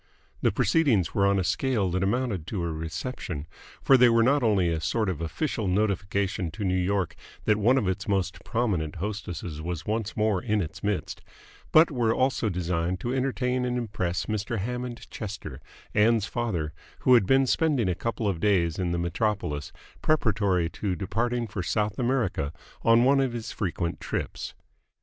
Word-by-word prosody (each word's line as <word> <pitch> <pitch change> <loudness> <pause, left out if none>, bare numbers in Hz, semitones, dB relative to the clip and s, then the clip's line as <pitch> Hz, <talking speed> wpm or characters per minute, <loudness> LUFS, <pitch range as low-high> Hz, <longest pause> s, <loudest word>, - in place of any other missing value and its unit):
The - - +3
proceedings 135 - +2
were 100 -1 +3
on 100 0 +3
a 95 - +1
scale 100 +2 0
that 90 +1 0
amounted 100 -4 0
to 95 -5 -2
a 85 - -1
reception, 80 - -5 0.4
for 135 - +7
they 125 -1 +7
were 115 0 +4
not 140 +4 +3
only 100 -7 +3
a 80 -1 -1
sort 105 +6 0
of 85 -4 -3
official 100 - -2
notification 100 -1 0
to 100 - -5
New 95 -2 +1
York 95 -1 0 0.3
that 105 -1 +3
one 120 +6 +4
of 110 -7 +1
its 95 +3 -2
most 95 -2 -1
prominent 95 -10 -1
hostesses 90 -4 -5
was 85 0 -4
once 110 +1 -2
more 105 -3 +2
in 110 -3 0
its 80 -5 -4
midst, 105 -2 -2 0.5
but 160 +1 +6
were 120 -4 +1
also 130 -4 +1
designed 90 0 -1
to 120 - -2
entertain 130 -1 0
and 125 0 -1
impress 105 -7 -2
Mr. 110 +2 -2
Hammond 125 +3 -4
Chester, 95 - -6 0.3
Ann's 110 0 +4
father, 90 -12 -2 0.3
who 130 - +5
had 115 -6 +5
been 135 0 +5
spending 140 - +2
a 90 - +2
couple 115 +3 -2
of 95 -5 -1
days 85 -5 +2
in 90 -1 0
the 85 - 0
metropolis 85 -4 -1 0.3
preparatory 100 - +2
to 95 +2 -3
departing 115 +7 -1
for 105 -3 -4
South 105 +5 -1
America 120 - 0 0.3
on 115 +1 +5
one 135 +2 +5
of 130 -3 +1
his 115 -2 -5
frequent 85 -4 -2
trips. - - -4
105 Hz, 175 wpm, -27 LUFS, 90-120 Hz, 0.5 s, for